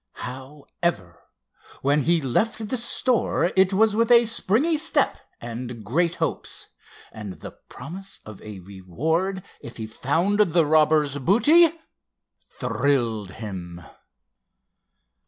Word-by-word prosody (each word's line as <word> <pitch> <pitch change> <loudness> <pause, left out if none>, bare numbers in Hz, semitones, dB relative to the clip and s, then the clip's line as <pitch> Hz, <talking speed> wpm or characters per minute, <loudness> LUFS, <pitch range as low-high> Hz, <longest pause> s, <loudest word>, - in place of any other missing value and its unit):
However, 130 - -5 0.6
when 145 +2 +3
he 165 +3 +2
left 210 - -1
the 255 - 0
store 235 -6 +2
it 190 0 +4
was 210 +2 +3
with 230 +1 +2
a 235 0 +7
springy 230 - +1
step - - +1 0.2
and 120 -1 -7
great 170 - 0
hopes—and 105 -3 -6
the - - -10
promise 195 +3 -10
of 110 -2 -11
a 105 -2 -9
reward 155 - -3 0.2
if 115 - -10
he 110 - -5
found 165 - -1
the 170 -5 +3
robber's 150 -2 +3
booty 295 - +5 0.9
thrilled 115 -9 -1
him. 95 -6 -7
150 Hz, 110 wpm, -24 LUFS, -, 0.9 s, a